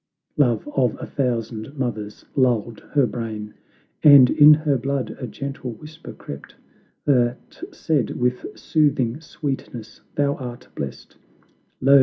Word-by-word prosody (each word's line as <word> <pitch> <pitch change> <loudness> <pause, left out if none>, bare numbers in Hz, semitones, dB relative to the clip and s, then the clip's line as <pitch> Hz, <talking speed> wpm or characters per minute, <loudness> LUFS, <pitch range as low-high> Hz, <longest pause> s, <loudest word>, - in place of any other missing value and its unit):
Love 120 -6 +2
of 130 -4 +2
a - - -5
thousand 120 0 -3
mothers 110 -5 -4
lulled 120 -4 +1
her 140 -3 +4
brain, 110 -2 -5 0.5
And 140 -4 +8
in 150 -1 +8
her 150 -2 +3
blood 135 +1 -2
a 125 - -4
gentle 135 +1 -6
whisper 155 +8 -11
crept, 70 - -10 0.5
That 125 - 0
said 155 - 0
with 125 0 0
soothing 145 -4 +1
sweetness, 135 -7 -6
"Thou 145 0 +1
art 125 -1 -8
blest; 70 -2 -7 0.6
Lo! 140 +1 +7
125 Hz, 125 wpm, -22 LUFS, 115-145 Hz, 0.6 s, And